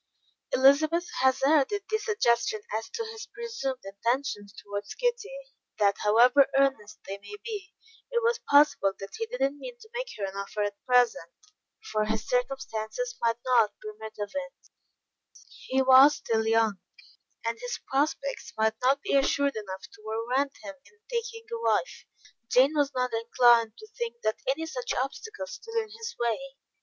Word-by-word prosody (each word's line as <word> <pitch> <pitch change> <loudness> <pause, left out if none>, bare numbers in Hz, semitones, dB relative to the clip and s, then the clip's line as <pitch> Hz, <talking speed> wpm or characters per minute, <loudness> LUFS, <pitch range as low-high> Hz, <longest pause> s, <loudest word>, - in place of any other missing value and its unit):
Elizabeth 310 +6 +4
hazarded 275 +9 +3
the 435 - +2
suggestion 235 - +1
as 220 +1 -3
to 460 0 -4
his 445 -1 -8
presumed 460 - -4
intentions 205 +1 -2
towards 205 0 -6
Kitty, 485 -3 -1 0.5
that 200 -2 +3
however 245 +6 +5
earnest 270 -7 +1
they 195 +1 -6
may 205 - -10
be, 415 -5 -6 0.3
it 475 -1 0
was 470 0 +2
possible 285 -9 +5
that 195 - -9
he 455 - -2
did - - -6
not 275 +1 +2
mean - - -8
to 440 -2 -16
make - - -3
her 200 - -2
an 190 0 -6
offer 200 +1 -3
at 205 0 -5
present, 245 -9 +3 0.6
for 215 0 +1
his 220 0 -2
circumstances 260 - -2
might 230 -1 +2
not 235 -5 +4
permit 215 +1 -9
of 205 -1 -4
it; 275 -1 -7 1.0
he 265 0 +2
was 265 +3 +8
still 220 -1 -1
young, 225 -3 +2 0.7
and 230 0 -2
his 245 0 -4
prospects 275 -1 -1
might 220 0 +2
not 270 +3 +2
be - - 0
assured 280 0 +2
enough 190 -3 -6
to - - -16
warrant 245 +6 -1
him 290 - -7
in 435 - -23
taking 465 -1 -3
a 465 0 -4
wife. - - 0 0.4
Jane 265 +4 +5
was 290 -2 +2
not 250 -1 0
inclined 230 -1 +4
to 435 - -11
think 475 -1 -5
that 215 - 0
any 285 +5 0
such 250 -6 -4
obstacles 285 - -4
stood 455 0 -10
in 440 -2 -1
his 455 +1 -7
way. 235 -1 +1
265 Hz, 165 wpm, -28 LUFS, -, 1.0 s, was